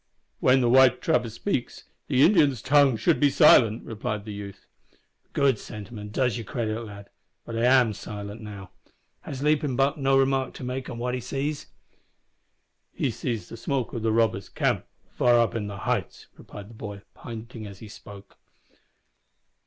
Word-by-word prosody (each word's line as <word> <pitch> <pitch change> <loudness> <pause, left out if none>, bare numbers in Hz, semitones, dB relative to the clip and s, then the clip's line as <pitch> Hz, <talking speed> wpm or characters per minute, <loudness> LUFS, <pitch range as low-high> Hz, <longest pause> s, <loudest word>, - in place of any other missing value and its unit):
"When 130 +1 +4
the 120 - +2
white 130 -1 +6
trapper 120 -1 +1
speaks, 120 - -3 0.2
the 135 -1 +3
Indian's 150 - +4
tongue 140 -3 +4
should 170 +7 +2
be 145 - +4
silent," 115 -4 +5
replied 105 -2 -4
the 105 - -6
youth. 100 -1 -9 0.3
"A - - -32 0.4
good 135 -5 +2
sentiment 105 0 -9
and 105 - -9
does 125 0 0
you - - -5
credit, 110 0 -3
lad. 100 -2 -11 0.3
But 115 - -6
I 115 - +2
am 125 -3 +4
silent 105 +1 -8
now. 100 -3 -9 0.5
Has 135 0 -7
Leaping 150 -3 +1
Buck 135 +4 +1
no 135 0 +3
remark 135 -1 +1
to - - -8
make 130 +1 -4
on 120 - -6
what 125 +1 -2
he 125 - -2
sees?" 140 +4 -3 1.2
"He - - -1
sees 115 -3 -4
the 115 - -9
smoke 130 +1 -2
of 115 - -3
the 110 0 +1
robber's 110 -3 +1
camp - - -1 0.3
far 120 -1 +4
up 115 -1 +3
the 105 -3 -4
heights," 105 -1 -3
replied 105 +2 -11
the - - -13
boy, 105 -2 -8
pointing 115 -1 -8
as 100 -1 -11
he 110 - -11
spoke. 100 -1 -13
120 Hz, 175 wpm, -26 LUFS, 105-130 Hz, 1.2 s, white